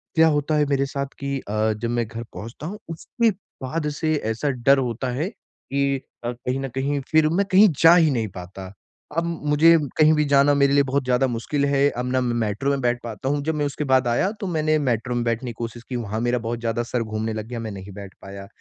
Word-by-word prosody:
क्या 160 Hz, 0 st, +6 dB
होता 150 Hz, 0 st, +1 dB
है 150 Hz, -1 st, +3 dB
मेरे 140 Hz, -1 st, +2 dB
साथ 140 Hz, 0 st, -3 dB
कि 140 Hz, 0 st, -2 dB
अ, 110 Hz, -1 st, -1 dB
जब 110 Hz, +2 st, -4 dB
मैं 120 Hz, -1 st, -1 dB
घर 115 Hz, +1 st, -6 dB
पहुँचता 115 Hz, +7 st, -8 dB
हूँ, 205 Hz, +4 st, -6 dB
उसके 225 Hz, +8 st, 0 dB, 0.3 s
बाद 150 Hz, +3 st, -2 dB
से 155 Hz, -1 st, +1 dB, 0.2 s
ऐसा 115 Hz, +6 st, -1 dB
डर 135 Hz, +1 st, +3 dB
होता 125 Hz, -1 st, -2 dB
है, 155 Hz, +9 st, -2 dB
कि 140 Hz, -, -3 dB, 0.3 s
अ, 120 Hz, -, -1 dB
कहीं 125 Hz, +2 st, -3 dB
न 135 Hz, 0 st, -4 dB
कहीं 140 Hz, +2 st, 0 dB
फिर 155 Hz, -1 st, +4 dB
मैं 190 Hz, +5 st, +1 dB
कहीं 200 Hz, +3 st, +7 dB
जा 165 Hz, +1 st, +8 dB
ही 165 Hz, -3 st, +5 dB
नहीं 115 Hz, -4 st, -1 dB
पाता। 95 Hz, +1 st, -9 dB, 0.4 s
अब 165 Hz, -, +2 dB, 0.3 s
मुझे 165 Hz, +3 st, +6 dB, 0.2 s
कहीं 155 Hz, 0 st, +6 dB
भी 150 Hz, -1 st, +2 dB
जाना 140 Hz, 0 st, +4 dB
मेरे 140 Hz, 0 st, +3 dB
लिए 140 Hz, 0 st, +5 dB
बहुत 140 Hz, +1 st, -1 dB
ज़्यादा 125 Hz, +1 st, +2 dB
मुश्किल 135 Hz, +4 st, -1 dB
है, 140 Hz, 0 st, +3 dB
अब 125 Hz, -, -2 dB
ना 130 Hz, -, +2 dB
मैं 120 Hz, -1 st, 0 dB
मेट्रो 105 Hz, +7 st, -2 dB
में 140 Hz, -1 st, -1 dB
बैठ 120 Hz, -1 st, +1 dB
पाता 115 Hz, +3 st, -4 dB
हूँ 145 Hz, 0 st, 0 dB
जब 160 Hz, +1 st, -1 dB
मैं 150 Hz, -1 st, 0 dB
उसके 145 Hz, +1 st, -3 dB
बाद 130 Hz, -2 st, +3 dB
आया 120 Hz, +12 st, +1 dB
तो 200 Hz, -, -2 dB
मैंने, 155 Hz, -3 st, +1 dB
मेट्रो 125 Hz, -3 st, -1 dB
में 120 Hz, -, 0 dB
बैठने 115 Hz, +1 st, -1 dB
की -, -, -10 dB
कोशिश 115 Hz, 0 st, -6 dB
की, 130 Hz, -, -3 dB
वहाँ 110 Hz, -2 st, -3 dB
मेरा 120 Hz, +1 st, +1 dB
बहुत 115 Hz, 0 st, -4 dB
ज़्यादा 115 Hz, 0 st, -1 dB
सर 120 Hz, 0 st, -2 dB
घूमने 110 Hz, 0 st, -3 dB
लग 110 Hz, 0 st, -5 dB
गया, 120 Hz, 0 st, -5 dB
मैं 110 Hz, -1 st, -5 dB
नहीं 100 Hz, 0 st, -9 dB
बैठ 100 Hz, -1 st, -9 dB
पाया। 100 Hz, 0 st, -9 dB
130 Hz, 240 wpm, -23 LUFS, 115-145 Hz, 0.4 s, जा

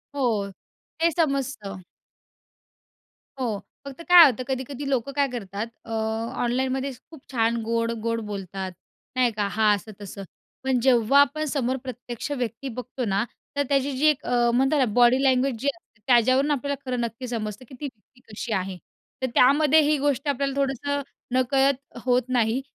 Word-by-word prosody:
हो 275 Hz, -, -1 dB, 0.8 s
ते 335 Hz, +1 st, +4 dB
समजतं. 275 Hz, -, -1 dB, 1.6 s
हो 225 Hz, -5 st, -1 dB, 0.3 s
फक्त 280 Hz, +4 st, -8 dB
काय 350 Hz, -2 st, +11 dB
होतं 255 Hz, -3 st, +1 dB
कधी-कधी 270 Hz, +1 st, -4 dB
लोकं 265 Hz, 0 st, 0 dB
काय 280 Hz, -1 st, +3 dB
करतात 210 Hz, -1 st, -4 dB, 0.2 s
अ, -, -, -9 dB, 0.5 s
ऑनलाईनमध्येच 260 Hz, +1 st, -1 dB
खूप 315 Hz, -5 st, -13 dB
छान 230 Hz, -1 st, +1 dB
गोड-गोड 230 Hz, 0 st, -1 dB
बोलतात 195 Hz, -2 st, -5 dB, 0.4 s
नाही 250 Hz, -2 st, +3 dB
का? 210 Hz, -1 st, -1 dB
हां 215 Hz, -1 st, +4 dB
असं-तसं. 200 Hz, -1 st, -9 dB, 0.4 s
पण 265 Hz, -2 st, +1 dB
जेव्हा 250 Hz, +1 st, +4 dB
आपण 305 Hz, +3 st, +1 dB
समोर 265 Hz, -3 st, -1 dB
प्रत्यक्ष 250 Hz, +1 st, -6 dB
व्यक्ती 250 Hz, -1 st, -3 dB
बघतो 250 Hz, +1 st, -5 dB
ना, 200 Hz, 0 st, +1 dB, 0.3 s
तर 285 Hz, -, +2 dB
त्याची 280 Hz, 0 st, +2 dB
जी 290 Hz, -, +1 dB
एक 300 Hz, -3 st, +2 dB
अ, 240 Hz, -1 st, +2 dB
म्हणतात 270 Hz, +4 st, +3 dB
ना, 260 Hz, -, +4 dB
बॉडी 245 Hz, +2 st, +5 dB
लँग्वेजजी 260 Hz, -1 st, +2 dB
असते 230 Hz, -9 st, -28 dB
त्याच्यावरून 255 Hz, +4 st, +4 dB
आपल्याला 280 Hz, 0 st, -1 dB
खरं 250 Hz, -1 st, -1 dB
नक्की 235 Hz, +2 st, -4 dB
समजतं, 220 Hz, 0 st, -4 dB
की 260 Hz, -, -11 dB
ती 295 Hz, -, -4 dB
व्यक्ती 250 Hz, 0 st, -12 dB
कशी 225 Hz, +2 st, -5 dB
आहे. 190 Hz, -1 st, -2 dB, 0.4 s
तर 260 Hz, -, +1 dB
त्यामध्ये 295 Hz, +4 st, +5 dB
ही 300 Hz, +1 st, +2 dB
गोष्ट 280 Hz, 0 st, 0 dB
आपल्याला 275 Hz, -1 st, 0 dB
थोडंसं 280 Hz, +1 st, -1 dB, 0.3 s
नकळत 270 Hz, +1 st, +1 dB
होत 250 Hz, 0 st, +3 dB
नाही. 245 Hz, 0 st, +1 dB
255 Hz, 155 wpm, -25 LUFS, 230-275 Hz, 1.6 s, काय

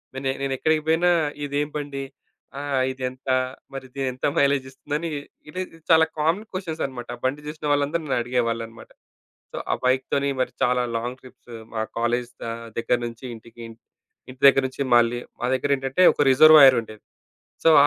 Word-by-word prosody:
నేను 135 Hz, 0 st, -2 dB
నేనెక్కడికి 155 Hz, +4 st, +1 dB
పోయినా 175 Hz, +2 st, +4 dB, 0.4 s
ఇదేం 145 Hz, +1 st, -1 dB
బండి 140 Hz, -2 st, -5 dB, 0.6 s
ఆహ్, 140 Hz, -2 st, -1 dB
ఇదెంత? 130 Hz, 0 st, -6 dB, 0.5 s
మరి 135 Hz, -1 st, -6 dB
ఇదెంత 130 Hz, -1 st, -3 dB
మైలేజ్ 140 Hz, -1 st, +3 dB
ఇస్తుందని 150 Hz, +5 st, -4 dB, 0.4 s
ఇది 185 Hz, +4 st, -4 dB, 0.3 s
చాలా 160 Hz, 0 st, +6 dB
కామన్ 165 Hz, +6 st, +1 dB
క్వెషన్సనమాట. 155 Hz, -, -4 dB
ఆ -, -, -26 dB
బండి 140 Hz, +3 st, -1 dB
చూసిన 150 Hz, 0 st, -7 dB
వాళ్ళందరూ 145 Hz, +3 st, +1 dB
నన్ను 140 Hz, -, -1 dB
అడిగేవాళ్ళన్నమాట. 115 Hz, -2 st, -3 dB, 0.6 s
సో, -, -, -7 dB
ఆ -, -, +3 dB
బైక్ 130 Hz, +1 st, +3 dB
తోని 140 Hz, 0 st, +1 dB
మరి 130 Hz, -, 0 dB
చాలా 125 Hz, 0 st, +2 dB
లాంగ్ 120 Hz, +3 st, -4 dB
ట్రిప్స్ 125 Hz, -1 st, -16 dB, 0.2 s
మా 110 Hz, -, -1 dB, 0.2 s
కాలేజి 120 Hz, +1 st, 0 dB
దా 115 Hz, -, -3 dB, 0.3 s
దగ్గర 120 Hz, +1 st, +1 dB
నుంచి 115 Hz, +2 st, -8 dB
ఇంటికి, 115 Hz, +1 st, -16 dB
ఇంట్ 115 Hz, 0 st, -15 dB, 0.5 s
ఇంటి 130 Hz, +1 st, -12 dB
దగ్గర 135 Hz, 0 st, +5 dB
నుంచి 135 Hz, +2 st, -4 dB
మళ్ళీ 120 Hz, 0 st, +3 dB, 0.2 s
మా 120 Hz, -, 0 dB
దగ్గరేంటంటే, 135 Hz, +4 st, +1 dB
ఒక 145 Hz, -, +2 dB
రిజర్వాయరుండేది. 130 Hz, -7 st, +6 dB, 0.6 s
సో 165 Hz, -, +7 dB
ఆ -, -, +6 dB
135 Hz, 155 wpm, -24 LUFS, 125-145 Hz, 0.6 s, సో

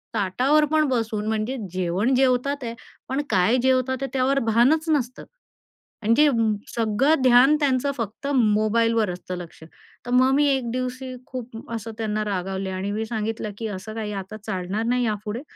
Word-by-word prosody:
ताटावर 250 Hz, +10 st, +2 dB
पण 310 Hz, -1 st, +3 dB
बसून 220 Hz, -4 st, -1 dB
म्हणजे 220 Hz, +4 st, -1 dB, 0.2 s
जेवण 185 Hz, +7 st, 0 dB
जेवतात 265 Hz, +2 st, +1 dB
आहे 230 Hz, -1 st, -4 dB, 0.4 s
पण 265 Hz, +2 st, 0 dB
काय 205 Hz, +5 st, +3 dB
जेवतात 260 Hz, 0 st, +2 dB
ते -, -, 0 dB
त्यावर 270 Hz, +1 st, +2 dB
भानच 250 Hz, +9 st, +3 dB
नसतं. 255 Hz, -5 st, -1 dB, 0.8 s
आणि 220 Hz, +2 st, +3 dB
जे 300 Hz, -, +6 dB, 0.5 s
सगळं 235 Hz, +7 st, +2 dB
ध्यान 255 Hz, +3 st, +6 dB
त्यांचं 280 Hz, -1 st, +1 dB
फक्त 230 Hz, +4 st, -5 dB
मोबाईलवर 225 Hz, -1 st, +2 dB
असतं 180 Hz, 0 st, -6 dB
लक्ष, 170 Hz, -2 st, -10 dB, 0.4 s
तर 245 Hz, -, -5 dB
मग 255 Hz, +1 st, +4 dB
मी 290 Hz, +1 st, +3 dB
एक 265 Hz, -4 st, 0 dB
दिवशी 255 Hz, +1 st, -4 dB
खूप 240 Hz, -3 st, -8 dB
असं 225 Hz, 0 st, -5 dB
त्यांना 215 Hz, -1 st, -1 dB
रागावले 190 Hz, -1 st, -3 dB
आणि 190 Hz, +2 st, -3 dB
मी 220 Hz, +2 st, -2 dB
सांगितलं 220 Hz, -1 st, -3 dB
की 225 Hz, -, -4 dB
असं 205 Hz, +1 st, -6 dB
काही 215 Hz, -2 st, -4 dB
आता 190 Hz, +3 st, -9 dB
चालणार 190 Hz, +1 st, -2 dB
नाही 250 Hz, 0 st, +1 dB
यापुढे. 215 Hz, +1 st, -3 dB
230 Hz, 160 wpm, -24 LUFS, 210-260 Hz, 0.8 s, जे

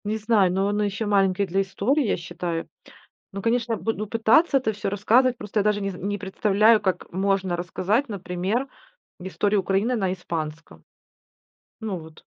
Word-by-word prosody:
Не 215 Hz, +1 st, -1 dB
знаю, 215 Hz, -4 st, +3 dB
но 190 Hz, +2 st, +1 dB
он 205 Hz, +1 st, 0 dB
ещё 205 Hz, +1 st, -1 dB
маленький 195 Hz, -1 st, +2 dB
для 190 Hz, +1 st, 0 dB
истории, 200 Hz, +10 st, 0 dB
я -, -, +1 dB
считаю. 170 Hz, -1 st, -4 dB, 0.6 s
Ну, 195 Hz, 0 st, -6 dB
конечно, 230 Hz, +1 st, 0 dB
я -, -, -1 dB
буду 215 Hz, -1 st, -2 dB
пытаться 230 Hz, +8 st, +4 dB
это 255 Hz, -4 st, 0 dB
всё 205 Hz, -1 st, -3 dB
рассказывать, 240 Hz, +6 st, +3 dB
просто 210 Hz, 0 st, -3 dB
я -, -, +2 dB
даже 210 Hz, 0 st, +1 dB
не 195 Hz, 0 st, -2 dB
не 200 Hz, +3 st, -4 dB
представляю, 210 Hz, +2 st, +3 dB
как 185 Hz, -3 st, -2 dB
можно 190 Hz, -1 st, 0 dB
рассказать, 185 Hz, +8 st, -1 dB
например, 195 Hz, +5 st, -2 dB, 0.5 s
историю 200 Hz, +2 st, 0 dB
Украины 200 Hz, +6 st, 0 dB
на 190 Hz, -5 st, 0 dB
испанском. 165 Hz, -3 st, -6 dB, 1.0 s
Ну 210 Hz, -5 st, -3 dB
вот 160 Hz, -1 st, -14 dB
200 Hz, 165 wpm, -24 LUFS, 185-220 Hz, 1.0 s, пытаться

